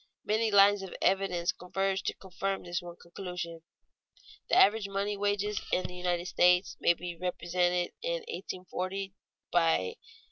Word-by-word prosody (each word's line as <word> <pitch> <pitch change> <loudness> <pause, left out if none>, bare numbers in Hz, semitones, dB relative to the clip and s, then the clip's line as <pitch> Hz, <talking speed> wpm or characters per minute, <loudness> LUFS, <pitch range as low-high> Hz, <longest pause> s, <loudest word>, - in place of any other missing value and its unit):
Many 220 +1 +2
lines 200 0 +6
of 190 - -7
evidence 185 -3 +1
converge 195 +2 -2
to - - -1
confirm 195 +1 -3
this 175 -1 -3
one 175 -1 -9
conclusion. 175 -2 -7 0.9
The - - +3
average 205 0 +5
money 200 +1 -1
wages 205 0 0
in 185 - +2
the 180 - -6
United 180 -1 -1
States 180 +1 +3
may 170 - +4
be 175 +1 -6
represented 175 0 0
in - - -1
1840 185 - -5 0.4
by 165 -2 +4
87. 460 - -10
185 Hz, 145 wpm, -30 LUFS, 175-195 Hz, 0.9 s, lines